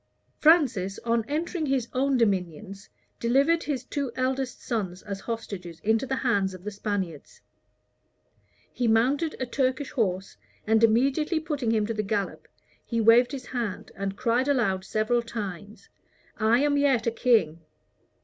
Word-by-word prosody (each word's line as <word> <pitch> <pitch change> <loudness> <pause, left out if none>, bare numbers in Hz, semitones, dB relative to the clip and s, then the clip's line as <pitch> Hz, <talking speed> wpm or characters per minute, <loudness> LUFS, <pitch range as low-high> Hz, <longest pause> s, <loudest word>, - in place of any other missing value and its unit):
Francis, 260 - +3
on 230 -1 +1
entering 315 +2 -2
his 265 -3 0
own 270 +1 +2
dominions, 195 -2 -1 0.3
delivered 275 +8 +3
his 275 -6 -3
two 275 0 -3
eldest 260 0 -2
sons 190 -7 -3
as 200 -2 -5
hostages 195 -7 -6
into 225 +4 +1
the 265 - -1
hands 200 -8 0
of 180 - -13
the 210 - -4
Spaniards. 200 -7 -4 1.3
He 245 - 0
mounted 265 +8 +2
a 255 - -1
Turkish 260 +3 -1
horse, 190 -6 -2 0.3
and 220 +1 +3
immediately 275 +9 +3
putting 295 -7 -2
him 220 -2 +2
to 230 - -2
the 215 - -1
gallop, 205 -1 -3 0.4
he 230 - -2
waved 230 +3 +5
his 265 -3 -6
hand, 235 -7 -4
and 195 0 -4
cried 250 +1 +1
aloud 215 -9 +1
several 220 +4 +1
times, 205 -3 -7 0.5
"I 225 +3 +3
am 290 0 +2
yet 275 -5 +2
a 230 - +2
king." 225 -9 +2
230 Hz, 150 wpm, -26 LUFS, 205-265 Hz, 1.3 s, waved